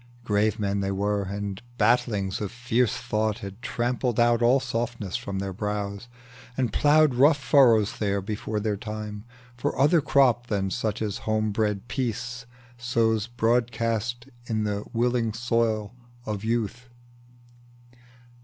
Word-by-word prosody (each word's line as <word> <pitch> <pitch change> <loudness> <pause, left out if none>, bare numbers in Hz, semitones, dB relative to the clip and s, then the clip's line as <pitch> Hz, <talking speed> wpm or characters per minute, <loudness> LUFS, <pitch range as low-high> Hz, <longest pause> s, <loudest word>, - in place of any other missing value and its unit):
Grave 105 -1 +1
men 100 -1 -1
they 95 0 -1
were, 100 +1 0
and 100 0 -4 0.2
battlings 105 -4 +1
of 105 - -3
fierce 120 -1 0
thought 110 0 -1
Had 100 +4 -9
trampled 120 0 -1
out 120 0 +4
all 120 +3 +5
softness 120 -6 -3
from 100 -1 -4
their 95 0 -3
brows, 105 +1 -4 0.5
And 125 -5 0
ploughed 150 -1 +4
rough 145 +5 +5
furrows 125 -6 +4
there 100 -2 0
before 105 +2 -3
their 105 -1 -1
time, 105 0 -6 0.3
For 120 - -2
another 150 +4 +4
crop 125 -4 +3
than 95 -3 -1
such 110 -1 -2
as 105 -2 -3
homebred 110 -1 0
Peace 125 0 -3 0.3
Sows 115 -3 +1
broadcast 115 0 0 0.2
in 110 -2 -1
the 105 -1 -2
willing 120 -1 +1
soil 115 -2 0 0.3
of 105 -1 -4
Youth. 120 +2 -2
110 Hz, 135 wpm, -26 LUFS, 105-120 Hz, 0.5 s, all